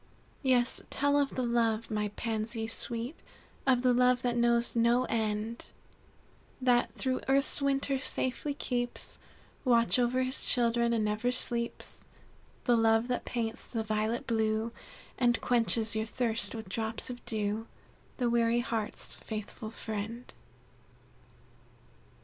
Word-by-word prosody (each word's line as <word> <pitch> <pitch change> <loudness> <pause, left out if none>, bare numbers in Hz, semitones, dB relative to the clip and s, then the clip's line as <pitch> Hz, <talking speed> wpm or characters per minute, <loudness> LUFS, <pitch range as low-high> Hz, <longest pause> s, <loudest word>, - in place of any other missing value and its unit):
"Yes, 250 -3 +2
tell 285 +1 +2
of 280 -1 0
the 255 - 0
love, 230 -2 +1
my 210 -1 0
Pansies 225 0 -2
sweet, 235 +6 -4 0.5
Of 255 -2 +4
the 250 -1 +5
love 250 0 +3
that 245 -1 +1
knows 235 0 +3
no 235 +2 +4
end; 220 0 -2 0.9
That 250 -2 +3
through 260 -1 -1
earth's 275 +1 +3
winter 275 -1 +1
safely 270 +2 -2
keeps 245 -3 -3 0.4
Watch 235 -1 +4
over 250 +1 +2
his 255 +1 -3
children, 235 -1 +2
and 225 -2 +1
never 210 +4 0
sleeps; 235 -1 -1 0.6
The 245 - +4
love 225 +1 +3
that 250 - -1
paints 230 -2 -3
the 225 -2 -2
violet 215 +2 -1
blue, 220 0 0 0.5
And 240 -2 +3
quenches 225 -2 +1
your 220 0 0
thirst 225 -2 0
with 220 -3 -6
drops 220 +5 -3
of 245 - -9
dew, 215 0 -2 0.5
The 245 - +1
weary 235 0 +3
heart's 225 -3 -3
faithful 215 +1 -6
friend." 220 +2 -6
235 Hz, 130 wpm, -31 LUFS, 220-250 Hz, 0.9 s, the